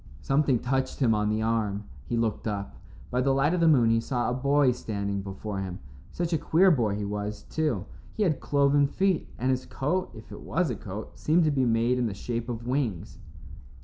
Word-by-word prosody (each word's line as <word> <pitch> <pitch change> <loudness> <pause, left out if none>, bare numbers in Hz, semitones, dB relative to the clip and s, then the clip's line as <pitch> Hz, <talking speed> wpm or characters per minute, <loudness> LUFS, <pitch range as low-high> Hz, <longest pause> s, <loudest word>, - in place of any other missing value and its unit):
Something 135 -2 +2
touched 130 +3 -1
him 120 -5 +3
on 105 0 +1
the 110 +1 0
arm. 110 -3 0 0.2
He 120 - -1
looked 115 -1 -1
up. 100 -2 -3 0.4
By 125 - +1
the 135 +1 +2
light 145 +5 +2
of 180 - +1
the 165 - +4
moon 125 -7 +5
he 115 - +3
saw 120 +1 -1
a - - 0
boy 140 +1 +3
standing 100 -4 -3
before 100 +1 -5
him. 95 -2 -4 0.3
Such 175 0 -2
a 160 - +2
queer 185 +6 +4
boy 115 -9 +1
he 105 0 -3
was, 105 +1 -4
too. 145 - -1 0.3
He 215 - +1
had 160 -8 +1
cloven 140 0 +3
feet, 190 +4 0
and 130 +2 +1
his 130 0 -2
coat, 180 +7 -1
if 110 - -12
it - - -9
was - - 0
a - - -2
coat, - - -8
seemed 165 +3 +3
to 155 - +3
be 135 -3 +1
made 120 +2 +2
in 120 - +1
the 100 - -4
shape 120 +3 -4
of 115 -1 -5
wings. 125 - -2
125 Hz, 215 wpm, -27 LUFS, 105-140 Hz, 0.4 s, moon